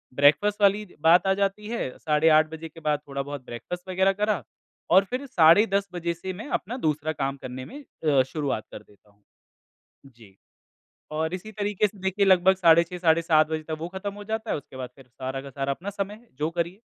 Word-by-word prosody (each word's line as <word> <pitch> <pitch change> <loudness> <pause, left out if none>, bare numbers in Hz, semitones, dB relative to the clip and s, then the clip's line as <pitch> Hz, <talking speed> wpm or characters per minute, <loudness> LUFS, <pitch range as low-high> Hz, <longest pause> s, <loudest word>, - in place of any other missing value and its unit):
Breakfast 155 +10 +4
वाली 205 +1 +4 0.2
बात 175 +3 +5
आ 190 - +4
जाती 200 +2 -1
है, 230 - -2
साढ़े 155 +1 +3
8 155 0 +5
बजे 160 0 -7
के 165 +2 -14
बाद 150 -1 0
थोड़ा 140 0 -3
बहुत 140 -2 -7
ब्रेकफ़ास्ट 180 +10 -7
वगैरह 190 +1 +2
करा 210 0 0 0.5
और 190 +3 +7
फिर 255 +3 -3
साढ़े 175 -2 +6
10 200 0 +1
बजे 170 -1 -2
से 185 +2 -6
मैं 210 +9 -8
अपना 230 +8 -7
दूसरा 155 +1 -1
काम 135 -2 -2
करने 130 0 -7
में 285 +4 -10
अ, 145 - +1
शुरुआत 135 -5 -3
कर - - -9
देता 105 0 -25
हूँ। 100 0 -34 0.8
जी। 115 -7 -18 0.8
और 160 +2 -2
इसी 190 +4 -6
तरीके 210 0 0
से 205 - -16
देखिए 190 +2 +1
लगभग 190 0 +5
साढ़े 170 -2 +6
6, 180 +1 -8
साढ़े 170 -1 +3
7 155 -2 +4
बजे 160 0 -3
तक 155 0 -4
वो 165 - -4
खत्म 190 +2 -5
हो 205 - -9
जाता 220 +1 -3
है। - - 0
उसके 140 - -13
बाद 130 -1 -5
फिर 135 -2 -17
सारा 130 +2 -5
का 140 - -9
सारा 135 +1 -2
अपना 185 +8 -7
समय 200 0 -4
है। 235 +2 -21
जो 150 +2 0
करिए। 175 +3 -3
170 Hz, 220 wpm, -25 LUFS, 145-200 Hz, 0.8 s, और